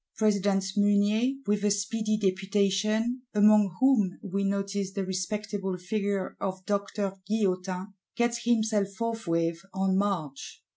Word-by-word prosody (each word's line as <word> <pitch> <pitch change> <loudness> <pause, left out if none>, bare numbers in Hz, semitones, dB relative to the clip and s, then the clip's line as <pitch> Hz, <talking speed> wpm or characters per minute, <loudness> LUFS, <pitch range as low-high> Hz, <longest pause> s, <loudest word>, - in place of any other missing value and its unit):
President 200 -2 +2
Mounier, 205 +5 +3
with 205 0 0
a 210 - +3
speedy 215 +2 0
Deputation, 205 +4 +1
among 210 -2 +5
whom 240 -9 +3
we 200 0 -2
notice 195 0 -1
the 195 -2 -2
respectable 195 +1 -3
figure 200 +1 -2
of 190 -1 -4
Doctor 200 -1 -1
Guillotin, 190 -2 -1 0.2
gets 235 0 0
himself 220 -4 +2
forthwith 170 -7 -1 0.2
on 190 0 +1
march. 180 -9 -2
200 Hz, 115 wpm, -28 LUFS, 190-215 Hz, 0.2 s, among